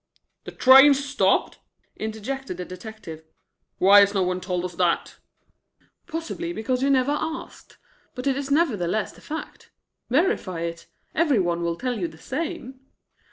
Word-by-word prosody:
"The - - -7
train 270 +2 +7
stopped?" 275 0 0 0.4
interjected 220 +1 -5
the 180 - -5
detective. 185 -4 -10 0.5
"Why 200 +2 +7
has 200 0 +4
no 190 - +2
one 180 0 -2
told 180 -1 -2
us 180 - -5
that?" 170 -1 0 0.9
"Possibly 335 +1 -4
because 250 +1 -2
you 275 - +2
never 265 0 +3
asked. 315 +2 -5 0.4
But 250 - -6
it 275 -1 +2
is 280 0 -4
nevertheless 215 - +1
the - - -18
fact. 315 +1 -8 0.4
Verify 260 - 0
it. 170 0 -5 0.3
Every 305 -6 +2
one 175 -3 0
will 170 0 -1
tell 250 -3 -3
you 175 - -1
the 160 - -14
same." 270 - -5
240 Hz, 150 wpm, -24 LUFS, 180-280 Hz, 0.9 s, train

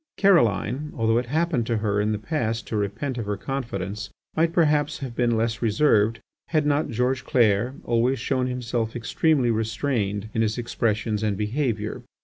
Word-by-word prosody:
Caroline, 150 - +3
although 115 0 +2
it 125 - -4
had 140 - -4
happened 160 -9 +1
to 115 - +1
her 105 -1 0
in 105 +1 0
the 105 - 0
past 115 -3 -2
to - - -4
repent 105 +6 -2
of 110 - -4
her 105 -1 -1
confidence, 105 -5 -4 0.3
might 165 +1 +2
perhaps 150 -4 +2
have 130 -4 -6
been 120 -2 +2
less 115 +1 -1
reserved 115 -1 +3 0.3
had 155 -3 +1
not 145 +1 +1
George 125 +2 0
Clair 120 0 +2
always 120 +3 +1
shown 130 -1 0
himself 120 -2 -2
extremely 125 +2 +2
restrained 110 -2 -1
in 110 - +1
his 110 0 0
expressions 115 -2 -1
and 105 -3 0
behaviour. 110 -1 -2
115 Hz, 170 wpm, -24 LUFS, 110-135 Hz, 0.3 s, Caroline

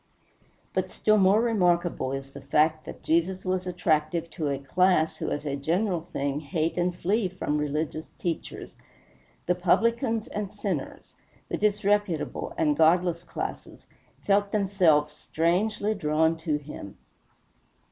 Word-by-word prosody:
But - - -1
still 215 0 +3
more 200 +4 +5
remarkable 175 - +1
is 135 0 -5
the 140 - -10
fact 155 +3 +2
that - - -9
Jesus 180 +4 +1
was 185 0 -1
attractive 165 -1 0
to 155 -4 -3
a 140 - -1
class 160 +3 +2
who - - -3
as 145 - -3
a 140 -1 -1
general 170 +4 -1
thing 140 +1 -1
hate 160 +2 -2
and 180 0 0
flee 200 +4 0
from 160 -5 -2
religious 150 +1 -3
teachers. 170 -2 -5 0.7
The 180 - +3
publicans 225 +6 +1
and 205 -2 -4
sinners, 195 -9 -5 0.4
the - - -1
disreputable 205 -4 0
and 150 -2 +2
godless 170 +2 +3
classes, - - -6 0.4
felt 200 0 +2
themselves 180 -8 +3
strangely 200 +8 0
drawn 160 -3 +1
to 160 -2 -1
him. 145 -9 -9
170 Hz, 135 wpm, -27 LUFS, 155-195 Hz, 0.7 s, more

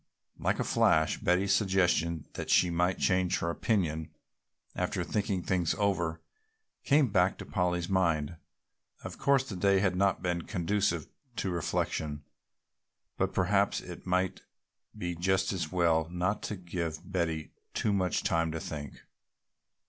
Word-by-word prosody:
Like - - +1
a - - +2
flash 80 0 +3
Betty's 95 +3 +2
suggestion 90 -5 +2
that - - -5
she 90 - +4
might 90 +2 +1
change 90 -1 +2
her 85 - -1
opinion 85 -6 0 0.7
after - - -1
thinking 100 -3 -1
things 90 -3 +1
over 90 -6 0 0.6
came 145 -3 +4
back 95 -1 +3
to - - -8
Polly's 90 -2 0
mind. 85 -4 +1 0.7
Of - - -7
course 135 -1 +3
the 105 - -5
day 100 +2 +3
had 95 -2 +1
not 100 +1 +1
been 90 -1 0
conducive 90 -2 0 0.3
to 95 -4 -2
reflection, 75 -3 -2 0.9
but - - 0
perhaps 100 +2 +2
it 90 +1 -10
might 90 0 0 0.6
be 90 0 -3
just 95 +3 +1
as 85 -5 -3
well 85 -3 +2
not 90 +4 -1
to 105 - -3
give 85 -2 -5
Betty 80 -4 -1 0.2
too 105 - +1
much 95 -3 0
time 80 -1 +1
to 80 - -3
think. 75 -3 -7
90 Hz, 140 wpm, -30 LUFS, 85-95 Hz, 0.9 s, she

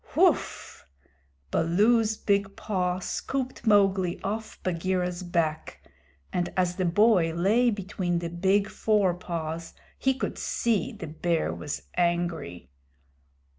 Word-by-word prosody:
"Whoof!" - - +1 0.6
Baloo's 215 +6 +3
big 200 -1 0
paw 180 -3 -1
scooped 255 +5 -4
Mowgli 195 -3 +3
off 215 +2 -4
Bagheera's 180 0 -1
back, 170 -3 -2 0.5
and 175 -1 -1
as 180 -1 +1
the 185 - 0
boy 180 -1 +4
lay 215 +8 +3
between 190 -4 -2
the 170 -1 -3
big 195 +4 +2
fore 210 -4 +2
paws 165 -2 -5 0.2
he 265 0 +2
could 265 - -4
see 235 +2 0
the 215 - -8
Bear 160 - -1
was 80 -4 -5
angry. 170 - -1
185 Hz, 115 wpm, -27 LUFS, 170-205 Hz, 0.6 s, boy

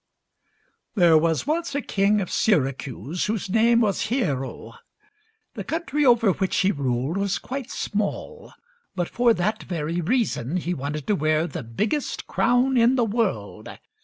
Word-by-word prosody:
There 175 -5 +5
was 160 0 +2
once 320 0 -1
a 285 - 0
king 200 +1 +2
of 185 - -5
Syracuse 140 - 0
whose 210 -3 -3
name 230 +2 +4
was 205 -2 0
Hiero. 135 - -2 0.8
The - - -6
country 320 -3 -2
over 230 -4 +5
which 190 +1 -1
he 195 - +3
ruled 135 +3 -1
was 200 -1 0
quite 265 -1 -6
small, 215 - -4 0.4
but 175 -2 -1
for 240 0 +2
that 215 +5 -1
very 170 0 -3
reason 185 - 0
he 180 0 -2
wanted 145 0 -4
to 210 - +1
wear 155 0 +1
the 160 - -5
biggest 205 - -2
crown 250 +2 +2
in 240 +2 +4
the 245 -3 +2
world. 225 +2 -2
200 Hz, 150 wpm, -24 LUFS, 155-235 Hz, 0.8 s, There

